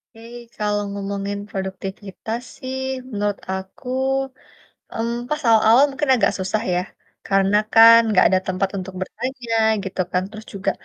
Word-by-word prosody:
Oke, 225 +1 -12 0.3
kalo 210 0 0
ngomongin 200 0 -4
produktivitas 195 +3 -5 0.2
sih, 260 0 -5 0.3
menurut 205 -2 -2
aku, 190 +7 -7 1.0
mmm 230 +1 -2
pas 300 0 -2
awal-awal 225 +4 +6
mungkin 275 +1 -3
agak - - +2
susah 190 +3 -1
ya. 180 - +1 0.5
Karena 195 +1 +3 0.2
kan, 230 +1 +9
nggak 185 - +5
ada 185 -1 +2
tempat 185 +1 0
untuk 185 0 -7
bertanya 240 +4 -4 0.3
gitu 190 - -4
kan. 180 - +1
Terus 215 0 -10
juga, 195 0 -1
205 Hz, 140 wpm, -21 LUFS, 190-230 Hz, 1.0 s, kan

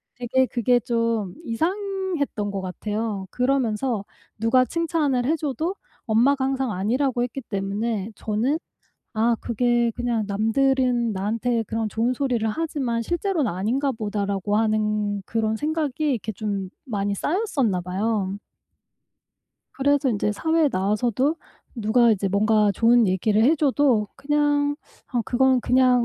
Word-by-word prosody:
되게 255 +2 +1
그게 245 0 +2
좀 230 -4 -1
이상했던 345 - -2
것 195 -1 -3
같아요. 210 +2 -3
그러면서 250 -4 0 0.3
누가 255 +4 +3
칭찬을 300 -4 0
해 310 +5 +2
줘도 310 +5 -2 0.3
엄마가 260 +5 +3
항상 265 -3 -1
아니라고 240 +6 0
했기 250 +2 -4
때문에 205 0 -3
저는 235 +9 -1 0.5
'아 230 +1 +2
그게 240 0 +1
그냥 240 -3 -1
남들은 240 +2 +1
나한테 225 +4 -1
그런 225 0 -2
좋은 230 +4 0
소리를 245 -4 0
하지만 255 -2 -2
실제로는 345 - -1
아닌가 240 +10 0
보다.'라고 205 -3 -2
하는 210 -2 0
그런 220 0 -1
생각이 305 +1 -1
이렇게 220 -3 -2
좀 200 -2 -3
많이 205 -5 -2
쌓였었나 280 - 0
봐요. 195 +1 -1 1.4
그래서 280 0 +2
인제 210 -2 0
사회에 320 +6 +2
나와서도 235 - +1 0.4
누가 235 +1 +3
이제 200 -2 +1
뭔가 210 +1 +3
좋은 235 -1 +4
얘기를 205 +4 +2
해 295 +6 +5
줘도 275 -8 +2
그냥 290 0 +1 0.4
어 240 - +1
그건 260 0 +3
그냥 250 -1 +3
235 Hz, 290 characters per minute, -24 LUFS, 210-270 Hz, 1.4 s, 해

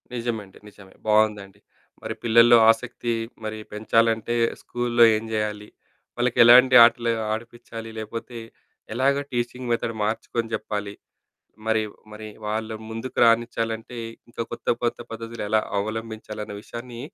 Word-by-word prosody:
నిజమండి 115 -5 -4
నిజమే. 100 -2 -16
బావుందండి. 105 -2 +1 0.4
మరి - - -4
పిల్లల్లో 115 +1 +6
ఆసక్తి 120 0 -3 0.3
మరి 110 0 -4 0.2
పెంచాలంటే 115 +1 +1 0.3
స్కూల్లో 120 -1 +1
ఏం 110 - -3
జేయాలి? 105 -1 -3 0.5
వాళ్ళకెలాంటి 125 +1 +6
ఆటలు 120 0 +1 0.2
ఆడిపించాలి 115 0 -8
లేకపోతే 115 +2 -6 0.6
ఎలాగా 140 +3 +2
టీచింగ్ 120 +1 -3
మెథడ్ 115 -1 -1
మార్చుకొని 115 +1 -2
చెప్పాలి. 105 -1 -3 0.7
మరి 110 -1 +2 0.3
మరి 110 0 -9 0.2
వాళ్ళ 110 +1 -2 0.2
ముందుకు 115 +3 -7
రానిచ్చాలంటే 115 0 0 0.3
ఇంకా 115 0 -5
కొత్త - - -1
కొత్త 120 - 0
పద్ధతులు 115 0 -7
ఎలా 110 0 +3 0.2
అవలంబించాలన్న 110 0 -5
విషయాన్ని 120 0 -8
115 Hz, 110 wpm, -24 LUFS, 110-120 Hz, 0.7 s, పిల్లల్లో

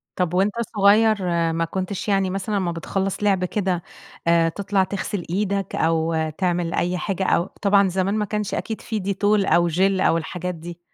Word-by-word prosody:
طَب 180 -2 -1
وأنت 195 +3 +2 0.2
صغيّر 210 +2 +5 0.4
ما 165 0 0
كنتش 190 +4 -4
يعني 195 -2 +2
مثلًا 195 +2 -2
أمّا 180 -3 -1
بتخلّص 195 +4 -3
لعب 190 -3 +2
كده 185 -3 -1 0.4
آآ، 165 -1 +4
تطلَع 200 +1 0
تغسِل 195 -1 -4
إيدك 195 +1 -1
أو 160 -1 +1
تعمل 175 -2 0
أي 180 +1 0
حاجة 195 0 -2
أو 175 -1 +2 0.2
طبعًا 200 -1 +4
زمان 190 +3 0
ما 210 -1 0
كانش 210 0 -3
أكيد 220 - -4
فيه 215 -4 -4
Dettol 200 0 -2 0.3
أو 175 0 +4
Gel 165 +3 -3 0.2
أو 165 - +3
الحاجات 180 +2 -4
دي. 170 +1 -9
190 Hz, 175 wpm, -22 LUFS, 175-200 Hz, 0.4 s, صغيّر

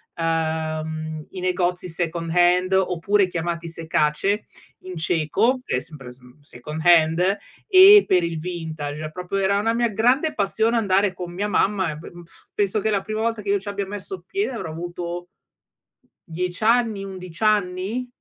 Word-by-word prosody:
ehm, 160 -1 -2
i 185 - -7
negozi 180 0 -1
second 165 0 -3
hand 180 +1 +3
oppure 190 +2 +2
chiamati 170 -1 -3
sekáč 165 +4 0 0.5
in 185 -1 -7
cieco, 170 - +1
che - - 0
è - - 0
sempre 135 -6 -11
smm 125 0 -18
mhmm, 125 +4 -20
second 145 +2 -8
hand 175 +3 +4 0.3
e 400 +1 +9
per 180 -2 +3
il 170 -1 -2
vintage. 155 -3 -5
Proprio 180 +4 -4
era 195 +1 +2
una 225 +2 +1
mia 235 0 +1
grande 250 +9 +2
passione 220 +3 +1
andare 200 -2 +2
con 175 -1 -7
mia 200 +4 -2
mamma 190 -3 +1
e 150 - -7
be 155 - -10 0.4
penso 205 +1 0
che 220 - -1
la 200 -2 +1
prima 215 +2 -4
volta 225 -1 -1
che 200 - -6
io 200 - +2
ci 195 - -13
abbia 200 -1 -3
messo 190 -2 -7
piede 395 - -2
avrò 220 -9 -5
avuto 175 +1 -6 1.0
10 180 +4 -4
anni, 225 -3 +2
11 185 -1 -8
anni? 210 +3 0
180 Hz, 165 wpm, -23 LUFS, 165-205 Hz, 1.0 s, e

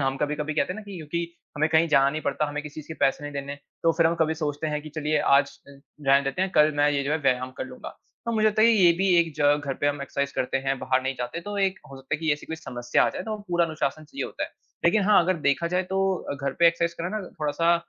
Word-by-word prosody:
हम 135 0 0
कभी-कभी 150 +1 -2
कहते 180 - 0
हैं - - -9
ना - - -7
कि 200 -2 -9
क्योंकि 170 +2 -3 0.3
हमें 155 +2 +2
कहीं 160 +1 +3
जाना 140 -2 +4
नहीं 155 +1 -4
पड़ता, 140 +2 0
हमें 150 0 -4
किसी 150 -1 -10
चीज़ 150 - -15
के - - -7
पैसे 140 +1 +2
नहीं 145 - -6
देने, 140 0 -5 0.3
तो 165 0 +4
फिर 165 0 +3
हम 165 - +2
कभी 160 0 +2
सोचते 150 -1 -3
हैं 150 -1 -2
कि, 155 - -8
"चलिए, 155 0 -1
आज 140 +1 +4 0.2
अ, - - -12 0.4
रहने 140 +1 +5
देते 135 +7 -1
हैं। 190 - -1
कल 150 0 +6
मैं 145 0 +4
ये 140 -1 0
जो 145 - -1
है, 160 - +1
व्यायाम 130 -2 0
कर - - -2
लूँगा।" 255 -1 -10 0.3
तो 235 - 0
मुझे 215 0 +3
लगता 215 0 +3
है 230 - +7
कि 215 - +3
ये 170 - +7
भी 190 +3 0
एक 165 -1 +2
ज 150 - -1 0.2
घर 135 -2 -2
पे 145 - +2
हम 145 0 0
एक्सरसाइज़ 140 0 -2
करते 130 - -1
हैं, 135 -1 0
बाहर 130 0 0
नहीं 130 +1 -2
जाते, 125 +7 -4
तो 205 +3 -6
एक 195 -1 +1
हो 135 - -9
सकता 135 +2 -4
है 150 - -2
कि 160 -2 +2
ऐसी 145 - -5
कोई 160 - -5
समस्या 120 -5 0
आ - - +2
जाए, - - -5
तो 215 -1 -4
पूरा 175 -1 +2
अनुशासन 155 -1 -3
चाहिए 270 - -5
होता - - -6
है। - - -10 0.3
लेकिन 215 - +4
हाँ, 210 -1 +6
अगर 185 +2 +1
देखा 170 +4 +1
जाए, 185 - +2
तो 190 +1 0
अ, 145 - -5
घर 140 -1 -3
पे 170 - +6
एक्सरसाइज़ 170 0 +2
करना 185 +6 -2
ना, 190 - -7
थोड़ा-सा 165 +3 +2
155 Hz, 295 wpm, -25 LUFS, 140-170 Hz, 0.4 s, है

